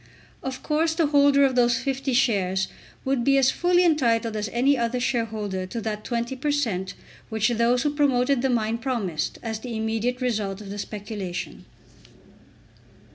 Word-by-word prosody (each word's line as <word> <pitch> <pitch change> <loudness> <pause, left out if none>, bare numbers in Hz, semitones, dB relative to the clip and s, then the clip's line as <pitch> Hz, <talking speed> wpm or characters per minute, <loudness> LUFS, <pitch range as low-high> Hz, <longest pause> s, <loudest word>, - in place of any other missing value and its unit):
Of 265 -1 -5
course 320 +1 +1
the 330 -1 +2
holder 285 -1 +4
of 265 -2 +1
these 240 -1 +3
50 270 +1 -2
shares 195 -7 +1 0.4
would 265 -2 +1
be 275 +2 +4
as 265 -1 +4
fully 355 0 +3
entitled 235 -8 +2
as 210 -1 -2
any 260 +6 +3
other 240 0 -1
shareholder 215 -6 -2
to 230 +5 -5
that 215 -1 -4
20 235 +1 -2
per 295 +4 -2
cent. 215 -11 -1 0.3
which 220 +1 +1
those 240 +1 +2
who 295 -1 0
promoted 275 -3 +2
the 265 - +1
mine 230 -1 0
promised 220 - -2
as 220 -2 -3
the 235 -1 -5
immediate 225 +3 -1
result 215 -6 -1
of 200 -2 -9
the 205 - -6
speculation. 205 -4 -6
240 Hz, 165 wpm, -25 LUFS, 215-270 Hz, 0.4 s, holder